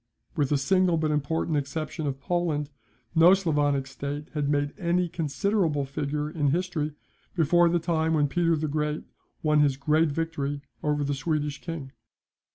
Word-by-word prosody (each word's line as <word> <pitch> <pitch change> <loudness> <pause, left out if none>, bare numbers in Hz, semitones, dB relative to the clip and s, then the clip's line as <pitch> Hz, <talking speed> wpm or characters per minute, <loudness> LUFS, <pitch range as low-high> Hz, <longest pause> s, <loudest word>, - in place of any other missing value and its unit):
With 145 -5 +1
the 145 - +3
single 180 +4 +2
but 155 -1 0
important 150 +1 0
exception 155 +2 -3
of 135 -1 -3
Poland, 150 -2 -1 0.4
no 170 +4 +7
Sclavonic 145 -7 +1
state 140 +3 -6
had 145 -2 -1
made 145 0 0
any 175 0 +1
considerable 165 -1 0
figure 145 +2 -2
in 150 -2 -1
history 155 -1 -1 0.4
before 175 +1 +4
the 175 - +2
time 160 -1 +1
when 145 -1 +3
Peter 165 +3 +2
the 155 0 -2
Great 150 +1 -1 0.4
won 150 -1 +3
his 140 -3 +3
great 155 +3 +2
victory 145 -2 -3 0.2
over 150 -1 0
the 145 0 -1
Swedish 150 0 -2
king. 160 -6 -6
150 Hz, 160 wpm, -27 LUFS, 145-165 Hz, 0.4 s, no